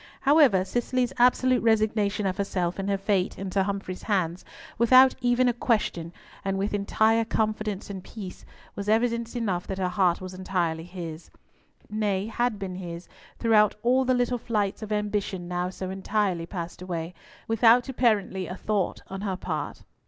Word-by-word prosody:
However, 275 Hz, -10 st, +5 dB
Cicely's 245 Hz, +3 st, -1 dB
absolute 250 Hz, +1 st, +4 dB
resignation 215 Hz, -2 st, +1 dB
of 190 Hz, 0 st, -1 dB
herself 185 Hz, -3 st, -1 dB
and 195 Hz, +1 st, -2 dB
her 200 Hz, -, +1 dB
fate 195 Hz, -1 st, 0 dB
into 195 Hz, 0 st, -1 dB
Humfrey's 195 Hz, -1 st, -3 dB
hands, 185 Hz, -4 st, -1 dB, 0.4 s
without 255 Hz, +3 st, +7 dB
even 245 Hz, +1 st, +3 dB
a 245 Hz, -, +3 dB
question, 210 Hz, -8 st, -1 dB, 0.3 s
and 195 Hz, 0 st, -1 dB
with 200 Hz, +2 st, -1 dB
entire 220 Hz, +2 st, +2 dB
confidence 215 Hz, -2 st, -2 dB
and 190 Hz, -2 st, -7 dB
peace, 195 Hz, -4 st, -9 dB, 0.3 s
was 200 Hz, +1 st, -4 dB
evidence 235 Hz, +1 st, +1 dB
enough 195 Hz, -7 st, -1 dB
that 190 Hz, -, -4 dB
her 185 Hz, -1 st, 0 dB
heart 180 Hz, -2 st, +2 dB
was 185 Hz, 0 st, -7 dB
entirely 175 Hz, -3 st, -2 dB
his; 175 Hz, -3 st, -8 dB, 0.6 s
nay, 205 Hz, -2 st, -1 dB
had 230 Hz, 0 st, -1 dB
been 195 Hz, -2 st, -5 dB
his 175 Hz, -1 st, -7 dB, 0.3 s
throughout 215 Hz, -3 st, +4 dB
all 255 Hz, +2 st, +3 dB
the 255 Hz, 0 st, +2 dB
little 245 Hz, 0 st, 0 dB
flights 210 Hz, -3 st, -1 dB
of 215 Hz, -1 st, -6 dB
ambition 205 Hz, -3 st, -2 dB
now 180 Hz, 0 st, -2 dB
so 185 Hz, 0 st, -6 dB
entirely 190 Hz, -3 st, -1 dB
passed 175 Hz, -2 st, -6 dB
away, 175 Hz, -2 st, -4 dB, 0.3 s
without 230 Hz, +2 st, +5 dB
apparently 215 Hz, -7 st, +1 dB
a 180 Hz, -, -5 dB
thought 205 Hz, -2 st, -2 dB
on 195 Hz, 0 st, -6 dB
her 195 Hz, -2 st, -2 dB
part. -, -, -4 dB
200 Hz, 160 wpm, -26 LUFS, 185-225 Hz, 0.6 s, without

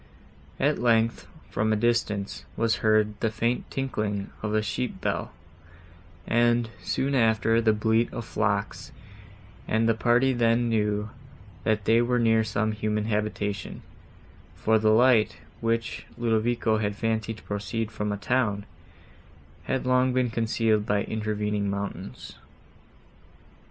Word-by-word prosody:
At 145 Hz, +2 st, +2 dB
length, 115 Hz, -1 st, +2 dB, 0.2 s
from 110 Hz, +1 st, 0 dB
a -, -, +3 dB
distance, 105 Hz, -3 st, 0 dB
was 115 Hz, 0 st, +2 dB
heard 110 Hz, -1 st, +2 dB
the 110 Hz, -, +1 dB
faint 115 Hz, +2 st, -1 dB
tinkling 105 Hz, -7 st, -3 dB
of 105 Hz, -, -2 dB
a 110 Hz, -, +2 dB
sheep 125 Hz, +3 st, -3 dB
bell; -, -, -2 dB, 0.9 s
and, 120 Hz, 0 st, +2 dB
soon 135 Hz, +9 st, -1 dB
after, 115 Hz, -2 st, +3 dB
the 110 Hz, -1 st, +4 dB
bleat 110 Hz, +2 st, +1 dB
of 115 Hz, -, -5 dB
flocks, 100 Hz, -3 st, -2 dB, 0.8 s
and 110 Hz, +1 st, +2 dB
the 115 Hz, -, +4 dB
party 120 Hz, +4 st, +3 dB
then 120 Hz, 0 st, +2 dB
knew, 105 Hz, -1 st, 0 dB, 0.5 s
that 110 Hz, -2 st, +1 dB
they 115 Hz, +3 st, +4 dB
were 125 Hz, +1 st, +1 dB
near 115 Hz, -1 st, +3 dB
some 110 Hz, 0 st, -1 dB
human 105 Hz, 0 st, -1 dB
habitation, 105 Hz, -2 st, -3 dB, 0.7 s
for 110 Hz, 0 st, +2 dB
the 110 Hz, 0 st, +3 dB
light, 115 Hz, -4 st, +4 dB, 0.2 s
which 115 Hz, 0 st, -2 dB
Ludovico 115 Hz, -1 st, +1 dB
had 105 Hz, -1 st, -1 dB
fancied 110 Hz, 0 st, -2 dB
to -, -, -15 dB
proceed 105 Hz, +2 st, -3 dB
from 105 Hz, -1 st, -3 dB
a 105 Hz, -, -2 dB
town, 105 Hz, -2 st, 0 dB, 1.0 s
had 130 Hz, -1 st, -1 dB
long 125 Hz, 0 st, +3 dB
been 125 Hz, -2 st, +1 dB
concealed 110 Hz, -1 st, +1 dB
by 100 Hz, 0 st, +1 dB
intervening 105 Hz, -1 st, -2 dB
mountains. 100 Hz, -1 st, -6 dB
110 Hz, 130 wpm, -26 LUFS, 105-115 Hz, 1.0 s, the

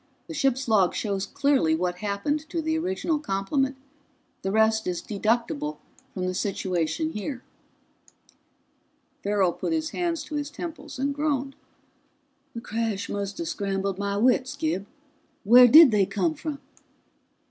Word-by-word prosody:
The 330 Hz, -, -7 dB
ship's 270 Hz, -3 st, 0 dB
log 200 Hz, -5 st, +3 dB
shows 200 Hz, -2 st, -2 dB
clearly 270 Hz, -, +2 dB
what 180 Hz, +1 st, -2 dB
happened 215 Hz, +11 st, -2 dB
to 335 Hz, -, -2 dB
the 315 Hz, 0 st, -1 dB
original 335 Hz, -2 st, -1 dB
complement. 270 Hz, +3 st, -1 dB, 0.6 s
The 190 Hz, -, -2 dB
rest 220 Hz, +1 st, +2 dB
is 180 Hz, -1 st, -1 dB
deducible 240 Hz, +8 st, -1 dB, 0.3 s
from 185 Hz, -2 st, -4 dB
the 185 Hz, -, -1 dB
situation 185 Hz, -, -1 dB
here." 250 Hz, +3 st, -5 dB, 1.8 s
Farrell 200 Hz, -3 st, +1 dB
put -, -, -3 dB
his 315 Hz, 0 st, -1 dB
hands 340 Hz, -2 st, -2 dB
to 305 Hz, -, -7 dB
his 290 Hz, 0 st, -3 dB
temples 330 Hz, 0 st, -8 dB
and 280 Hz, +2 st, -1 dB
groaned. 280 Hz, -2 st, -1 dB, 1.0 s
"The 230 Hz, -, -5 dB
crash 225 Hz, -3 st, -3 dB
must 200 Hz, 0 st, -4 dB
have 335 Hz, -1 st, -4 dB
scrambled 195 Hz, -3 st, -2 dB
my 200 Hz, 0 st, -1 dB
wits. 255 Hz, +4 st, +2 dB
Gib, 285 Hz, -10 st, -2 dB, 0.6 s
where 245 Hz, +4 st, +8 dB
did 305 Hz, +1 st, +9 dB
they 200 Hz, -3 st, +3 dB
come 175 Hz, -5 st, 0 dB
from?" 300 Hz, -, -5 dB
235 Hz, 140 wpm, -26 LUFS, 200-295 Hz, 1.8 s, did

